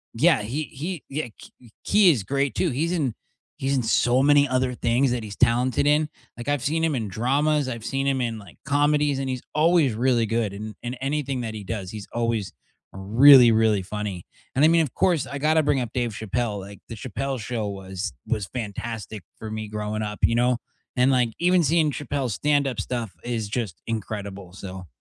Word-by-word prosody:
yeah, - - +4
he 130 +9 -3
he 160 +5 -6
yeah, 150 +3 -2
h 115 - -14 0.3
he 205 -3 +5
is 115 -10 -1
great 140 +6 -1
too, 180 - +1
he's 160 +7 -1
in 140 -10 0 0.4
he's 135 +1 0
in 125 - 0
so 120 +3 +3
many 145 0 +5
other 130 0 +1
things 120 +2 +1
that 120 -2 -2
he's 105 -2 -7
talented 125 +3 +2
in. 150 +1 +3 0.3
Like, 120 +4 -5
I've 145 -3 0
seen 160 +3 0
him 165 -2 +2
in 110 -4 -2
dramas, 140 +7 +1
I've 115 -3 -6
seen 135 0 -1
him 135 -1 +1
in, 115 -2 -2
like, 100 -5 -13
comedies, 145 0 +2
and 135 -1 -2
he's 130 -1 -3
always 160 -4 +4
really 120 0 +2
good 110 -2 -1
in 105 +1 -6
in 125 +2 -4
anything 135 -1 -2
that 110 -2 -4
he 105 -2 -7
does, 100 -3 -5
he's 105 -2 -8
always 115 -5 -1 0.4
really, 120 +6 +7
really 110 -3 +3
funny. 100 -2 -5 0.3
And 140 - +5
I - - +7
mean, 165 0 +5
of 145 -7 -1
course, 170 -7 +2
I 140 - -5
gotta 155 +3 +3
bring 140 -3 +2
up 120 -1 -4
Dave 120 -3 -1
Chappelle, 110 0 -2
like, 100 +1 -10
the 115 - -6
Chappelle 130 +4 -4
Show 110 -1 -3
was 95 -1 -5 0.2
was 105 -4 -1
fantastic 110 -1 -5 0.2
for 110 - -6
me 110 0 -4
growing 105 0 -3
up, 105 -1 -4
you - - +4
know, 125 +1 +2 0.4
and, 125 +2 +4
like, 125 -3 +3
even 180 0 +4
seeing 155 0 +3
Chappelle's 135 -4 -3
stand-up 145 -3 +1
stuff 120 -5 -4
is 115 -3 -2
just 105 -6 -4
incredible, 100 -4 -5
so 95 -2 -8
120 Hz, 200 wpm, -24 LUFS, 110-140 Hz, 0.4 s, really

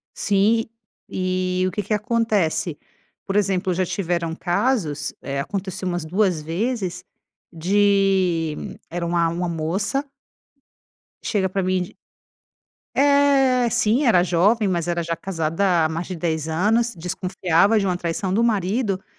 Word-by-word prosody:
Sim, 210 +3 +2 0.4
e 185 0 -1
o - - -2
que 210 - -2
que 205 +2 -3
acontece? 210 - 0 0.5
Por 195 - -3
exemplo, 190 -2 +1
já 185 +2 0
tiveram 170 -3 -2
casos, 175 - -1
eh, 140 0 -3
aconteceu 190 +4 -4
umas 175 -2 -2
2 185 0 +1
vezes, 185 +2 -3 0.5
de 190 -2 +2 0.3
era 170 0 -3
uma 170 -1 +1
uma 175 +1 -2
moça 190 - -1 1.2
chega 195 -4 0
pra 195 +1 -1
mim 185 0 +1
de 180 - -12 1.0
Eh, 275 -3 +4
sim 245 +4 +2
era 185 -8 +5
jovem, 195 +6 +2
mas 175 -3 -1
era 170 0 0
já 165 0 -2
casada, 165 0 0
há 155 - 0
mais 165 +2 -3
de 185 - -5
10 160 -2 -2
anos, 220 +9 +1
desconfiava 185 +3 +1
de 195 - 0
uma 180 -1 0
traição 175 +2 -2
do 225 +4 +2
marido 205 -1 0
185 Hz, 140 wpm, -22 LUFS, 170-210 Hz, 1.2 s, era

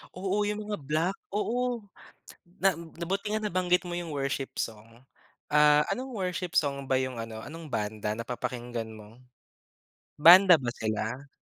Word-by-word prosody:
Oo 195 +3 0
yung 210 +1 -2
mga 205 - -2
black, 155 +6 -1 0.2
oo, 240 +2 -1 0.8
na 195 -1 +3
na 165 +1 -8
buti 200 +3 -2
nga 215 - 0
nabanggit 180 -2 +1
mo 175 - -4
yung 175 -1 -4
worship 135 -1 -2
song. 115 +2 -6 0.4
Ah, 150 0 +5
anong 260 +2 -4
worship 180 -2 -3
song 140 -2 -1
ba 130 - +4
yung 130 -2 -3
ano, 115 -1 -7
anong 160 0 -9
banda 105 -1 -2
napapakinggan 120 -1 -4
mo? 110 +2 -13 1.0
Banda 180 +4 +9
ba 120 -2 -2
sila? 110 +4 -3
150 Hz, 145 wpm, -28 LUFS, 120-185 Hz, 1.0 s, Banda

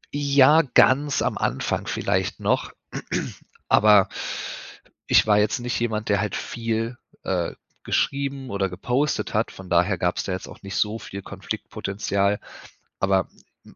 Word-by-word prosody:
Ja, 145 +2 +5
ganz 140 +1 +4
am - - -1
Anfang - - -1
vielleicht - - -1
noch, - - 0 1.0
aber 105 -2 +6 1.0
ich - - +5
war 105 -1 +5
jetzt 105 +3 +2
nicht 120 0 -2
jemand, 110 -2 -2
der 100 -1 +3
halt 105 -2 -2
viel, 115 0 -3 0.3
äh, 90 -3 -1 0.3
geschrieben 140 -1 -1
oder 100 -2 -1
gepostet 125 +11 -1
hat, 110 +1 +1
von 95 -1 -11
daher 90 +3 +3
gab's 90 +1 0
da - - -4
jetzt 95 0 -4
auch - - -13
nicht 100 0 -5
so 110 +2 0
viel 100 -2 -8
Konfliktpotenzial. 100 +1 -2 0.6
Aber 95 -1 +2 0.4
m - - -17
105 Hz, 140 wpm, -24 LUFS, 95-125 Hz, 1.0 s, aber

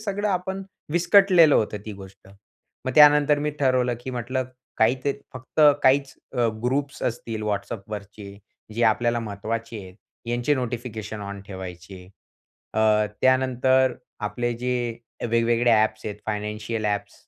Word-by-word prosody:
सगळं 205 0 -2
आपण, 190 +1 -2 0.3
विस्कटलेलं 175 -2 +5
होतं 105 -1 +1
ती 105 - -5
गोष्ट. 95 0 -14 0.6
मग 130 - -2
त्यानंतर 150 -1 +6
मी 150 +1 -1
ठरवलं 130 -2 +2
की 130 - -6
म्हटलं, 130 +1 -2 0.3
काही 110 +3 +4
ते 140 - +2 0.2
फक्त 130 +4 -4 0.2
काहीच 135 +1 +3 0.2
अ, 120 -3 +1 0.2
ग्रुप्स 140 +3 -1
असतील 115 -2 -3
WhatsAppवरचे, 100 -1 -5 0.4
जे 120 - -1
आपल्याला 120 +2 +2
महत्त्वाचे 110 +1 -5
आहेत. 95 -1 -12 0.3
यांचे 120 +4 +1
नोटिफिकेशन 115 -4 -5
ऑन 100 0 -6
ठेवायचे. 95 -1 -9 0.7
अ, 110 - +1 0.4
त्यानंतर 130 0 +3 0.3
आपले 120 +3 -2
जे, 125 -2 -2 0.3
वेगवेगळे 115 +1 +2
एप्स 110 0 -2
आहेत 105 - -4
फायनान्शियल 105 +1 -3
एप्स, 100 0 -2
120 Hz, 130 wpm, -24 LUFS, 105-130 Hz, 0.7 s, त्यानंतर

